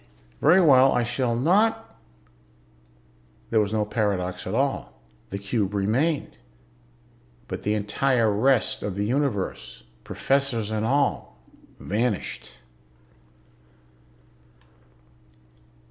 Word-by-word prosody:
Very 165 +6 +5
well, 135 -6 +6
I 125 - +1
shall 120 0 -1
not 190 - +1 0.8
..." 60 0 -33
There 110 - +3
was 105 -1 0
no 110 -1 0
paradox 100 -4 -2
at - - -3
all. - - -2 0.3
The 100 - -4
cube 100 0 -2
remained. 130 +11 0 1.1
But - - -6
the 105 +1 0
entire 110 +2 +1
rest 120 +4 +1
of 100 -3 -4
the 100 +1 -1
Universe, 105 - -2 0.2
professors 135 -6 -1
and 110 0 -1
all, 140 +3 0 0.4
vanished. 100 - -3
110 Hz, 100 wpm, -24 LUFS, 100-135 Hz, 1.1 s, well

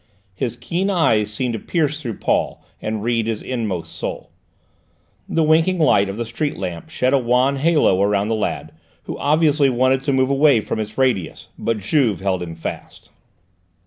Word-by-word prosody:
His 120 +5 -3
keen 170 +11 -2
eyes 115 - +2
seemed 120 +3 -2
to 115 - -3
pierce 155 - -1
through 115 -7 -4
Paul - - -1 0.2
and 110 -1 -3
read 115 -1 0
his 110 -2 -3
inmost 110 -9 -3
soul. - - -5 1.0
The 165 - +1
winking 160 +4 +3
light 100 - +3
of 100 - -5
the 120 - -2
street 145 +6 -3
lamp 90 -4 -5
shed 130 +1 0
a 140 - +5
wan 125 +3 +2
halo 145 - +3
round 100 +1 +1
the - - +2
lad, 110 - -3 0.3
who - - -6
obviously 150 -2 +3
wanted 130 +1 +2
to 145 - +1
move 130 0 +2
away 140 -3 +4
from 110 - -4
its 110 0 -5
radius, 125 -10 0
but 115 -1 -1
Juve 110 - +1
held 95 -1 -1
him 85 -2 -6
fast. 80 - -8
120 Hz, 175 wpm, -20 LUFS, 105-145 Hz, 1.0 s, a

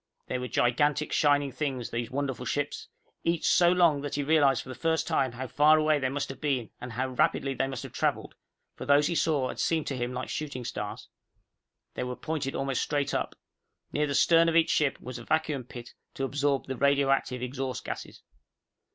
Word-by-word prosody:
They 125 - -3
were 125 - -4
gigantic 145 +6 +1
shining 145 -2 +3
things, 130 -3 -3
those 115 -1 -3
wonderful 130 -2 -3
ships, 145 0 -2 0.4
each 170 -1 0
so 175 -1 +5
long 170 -5 +4
that 145 -1 -4
he 145 - -1
realized 140 -3 +3
for - - -13
the - - -5
first 160 +3 0
time 135 -7 +1
how 130 +2 -5
far 150 +5 +5
away 155 -1 +3
they 130 -1 0
must 140 +1 -3
have 135 - -8
been 135 -6 -1
and 125 -1 -6
how 130 +3 -1
rapidly 135 +2 +1
they 135 - -1
must 135 -3 -5
have - - -9
traveled, - - -1 0.4
for - - -8
those 145 +1 +5
he 170 - 0
saw 150 -6 +1
had - - -6
seemed 160 -2 +1
to 135 - -3
him 120 0 -2
like 125 0 -5
shooting 140 -5 -4
stars. 105 -2 -5 0.9
They - - -3
were 125 0 -4
pointed 150 -3 -3
almost 135 -2 -1
straight 145 -1 -1
up. - - -2 0.6
Near 150 +1 +1
the 140 - -2
stern 165 +2 +5
of 165 - -1
each 165 -1 +4
ship 145 -3 +1
was 125 -1 -7
a - - -9
vacuum 155 -3 0
pit 120 -1 -10 0.2
to 135 - -3
absorb 140 0 0
the 130 -1 -5
radioactive 135 -2 +2
exhaust 130 0 -4
gases. - - -7
140 Hz, 205 wpm, -28 LUFS, 130-150 Hz, 0.9 s, so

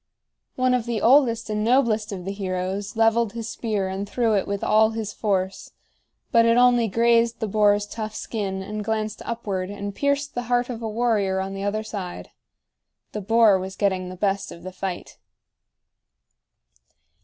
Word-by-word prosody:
One 255 0 +2
of 245 -2 0
the 235 -2 -1
oldest 235 -2 +4
and 210 0 -1
noblest 225 -3 +2
of 185 -3 -6
the 195 - -2
heroes 195 +1 -3
leveled 225 -1 +2
his 230 -1 -5
spear 210 -5 -2
and 195 +2 -4
threw 230 +1 +1
it 200 - +1
with 200 0 -3
all 220 0 +4
his 220 -2 -4
force; 195 -3 -2 0.6
but 230 -1 +5
it 230 +1 +4
only 245 -2 +5
grazed 230 +2 +2
the 220 - -2
boar's 205 0 +3
tough 215 0 -6
skin 195 -4 -4
and 210 +2 -5
glanced 215 0 -2
upward 200 -5 -3
and 200 0 -5
pierced 280 +3 -1
the 245 - -2
heart 245 0 +1
of 235 -1 -6
a 225 - -3
warrior 210 -4 +1
on 190 0 -3
the 195 0 -5
other 210 +2 -1
side. 195 -5 -7 0.8
The 210 - -4
boar 215 -1 +4
was 190 +1 -6
getting 190 -3 0
the 185 - -7
best 195 +1 -1
of 170 - -11
the 185 - -6
fight. 185 -1 -6
215 Hz, 175 wpm, -24 LUFS, 195-230 Hz, 0.8 s, but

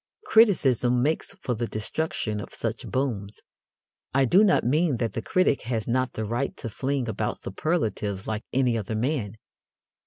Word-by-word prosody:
Criticism 130 - +4
makes 155 +6 -1
for 125 - 0
the 120 0 -2
destruction 110 -1 -2
of - - -8
such - - -4
booms. 110 -7 -2 0.8
I 135 -1 +5
do 185 - +5
not 195 -4 +4
mean 150 +2 +2
that 115 -3 -2
the 115 - -2
critic 185 +1 +2
has 115 -4 -1
not 130 +1 0
the 110 - -3
right 120 +6 -2
to 115 - -5
fling 130 +2 -2
about 110 -1 -2
superlatives 105 - -2
like 110 0 -3
any 125 -2 +2
other 110 +1 -4
man. 115 -3 -1
120 Hz, 160 wpm, -26 LUFS, 110-140 Hz, 0.8 s, I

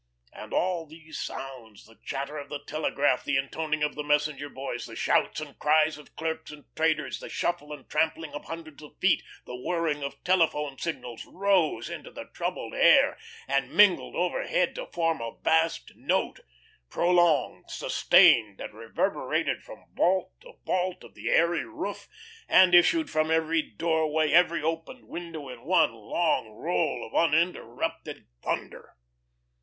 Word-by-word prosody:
And - - -10
all 175 -3 0
these 160 +1 -10
sounds, 120 -6 -7
the 115 +1 -20
chatter 140 +2 -4
of 140 -1 -9
the 145 -1 -6
telegraph, 145 -3 0
the 140 - +1
intoning 155 +3 -2
of 150 - 0
the 150 - -4
messenger 150 0 0
boys, 130 -3 -5
the - - -10
shouts - - +1
and 150 -2 -9
cries 155 +1 +3
of 150 - -17
clerks 160 0 -4
and 150 -1 -11
traders, 160 0 0
the - - -9
shuffle 150 -3 -2
and 150 - -9
trampling 160 0 -1
of 145 - -7
hundreds 165 -3 -8
of 150 - -14
feet, 190 - +3 0.2
the 125 - -7
whirring 150 +2 -1
of 140 0 -6
telephone 155 -6 +1
signals 125 -8 -5
rose 190 -4 +1
into - - -7
the - - -9
troubled - - -4
air, - - +5 0.3
and 135 -1 0
mingled 205 -4 +5
overhead - - 0
to - - -6
form 165 -5 -1
a 115 0 -6
vast 160 +1 +1
note, - - -1 0.5
prolonged, 175 -3 +2
sustained, 105 -4 +4
that - - -7
reverberated 115 +1 -1
from - - -13
vault 185 +2 +2
to - - -14
vault 185 0 -1
of - - -14
the - - -5
airy 170 +1 +3
roof, 330 0 -6 0.4
and 185 -1 +6
issued 315 - +5
from 155 0 0
every 160 0 +2
doorway, 160 -2 0
every 170 -1 +4
opened 165 +10 -4
window 165 -4 -7
in 125 -2 -9
one 160 -4 +3
long 115 +5 0
roll 160 +11 -1
of - - -13
uninterrupted 165 +2 0 0.2
thunder. - - -5
160 Hz, 155 wpm, -27 LUFS, 145-170 Hz, 0.5 s, and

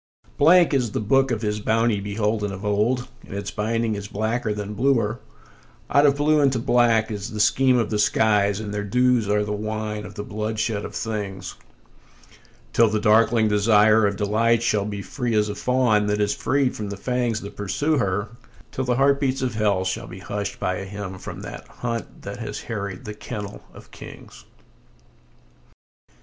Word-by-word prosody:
Blank 170 +2 +5
is 125 -6 0
the - - -1
book 135 +6 +2
of 115 -2 -2
his 105 0 -1
bounty 110 0 +1
beholden 105 +1 -1
of 100 +1 -7
old, 110 +5 +1 0.2
and - - -9
its 100 0 -4
binding 115 +1 -1
is 100 -1 -5
blacker 110 +2 -2
than 105 0 -4
bluer; 115 -2 +1 0.7
Out 145 +1 +5
of 140 - +3
blue 150 +1 +3
into 135 -3 +3
black 115 -2 +2
is 105 +1 -4
the 110 -3 -6
scheme 130 +4 +4
of 115 - 0
the 105 - 0
skies, 105 -1 +2
and 105 -1 -5
their 105 -1 -2
dews 125 +1 +2
are 105 0 +2
the 105 - -4
wine 105 0 -3
of 105 - -10
the 105 - -5
bloodshed 110 0 -2
of - - -8
things; 105 -4 -4 1.2
Till 115 -1 +5
the 110 0 0
darkling 110 +1 +4
desire 105 +1 +4
of 100 - -2
delight 110 +3 +1
shall 105 -4 +1
be 100 -1 -5
free 120 -1 -2
as 105 0 +2
a - - -2
fawn 115 -3 +2
that 105 0 0
is 105 0 +1
freed 140 -2 0
from 105 -2 -5
the 100 - -5
fangs 120 -1 -1
that 100 - -9
pursue 145 +10 0
her, 100 0 -1 0.4
Till 130 - -3
the 125 -1 +1
heartbeats 135 0 +2
of 125 -3 -1
hell 100 -4 +1
shall 110 +5 -3
be - - -9
hushed 100 +1 -5
by 90 - -1
a 95 - -5
hymn 95 -1 -7
from - - -8
that - - -8
hunt 115 -1 -6
that - - -6
has - - -5
harried 100 -4 -5
the 105 - -5
kennel 105 -1 -7
of - - -15
kings. - - -12
110 Hz, 185 wpm, -23 LUFS, 105-120 Hz, 1.2 s, Blank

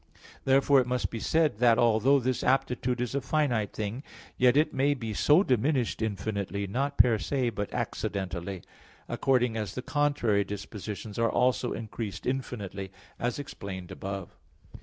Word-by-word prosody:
Therefore 135 0 +5
it 125 - -4
must 125 0 -1
be 115 - -4
said 155 -3 +1
that, 120 -2 +5
although 120 +4 +4
this 130 0 -1
aptitude 125 -2 +1
is 125 0 -2
a 140 - 0
finite 125 -6 0
thing, 110 +4 -4 0.3
still 125 +2 +4
it 155 - +3
may 140 +2 +2
be 115 -5 -5
so 150 - +5
diminished 130 - +1
infinitely, 100 -2 -2
not 135 +8 -2
per 115 -3 +5
se, 130 -2 0
but 105 -1 -4
accidentally; 95 -2 -3 0.4
according 125 -3 +1
as 105 -3 -3
the 125 - -4
contrary 145 -9 +1
dispositions 105 +1 -6
are 115 0 +3
also 125 -1 +1
increased 110 -3 -6
infinitely, 100 -7 -4 0.3
as 120 0 -1
explained 95 - -7
above. 95 -2 -6
120 Hz, 150 wpm, -28 LUFS, 105-130 Hz, 0.4 s, Therefore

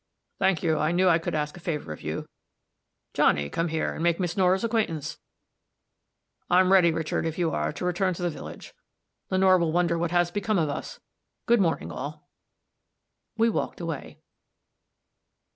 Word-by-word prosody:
"Thank 190 -5 +2
you. 160 -3 +2
I 155 +2 +1
knew 185 +2 +3
I 170 -2 +5
could 165 - -3
ask 150 -1 -2
a - - -10
favor 150 - -4
of - - -12
you. - - -4 0.9
Johnny, 70 0 +2
come 165 - 0
here, 160 -1 -1
and - - -6
make 170 +1 +2
Miss 175 -2 -1
Nora's 190 +1 +3
acquaintance. 215 -10 -1 1.3
I'm 185 +1 +4
ready, 180 -3 +6
Richard, 160 -1 -2
if 160 -1 -3
you 170 -2 +1
are, 75 0 -1
to - - -5
return 180 +1 0
to 175 - -6
the 175 - 0
village. - - -9 0.6
Lenore 185 -1 +4
will 170 -2 +1
wonder 170 0 +1
what 170 0 0
has 175 0 +2
become 205 +2 0
of 160 -3 +1
us. 145 - -5 0.5
Good 235 -2 +4
morning, 165 -3 0
all." 150 +3 -7 1.1
We 225 +1 +4
walked 230 - -2
away. 165 -5 -5
170 Hz, 170 wpm, -26 LUFS, 160-185 Hz, 1.3 s, ready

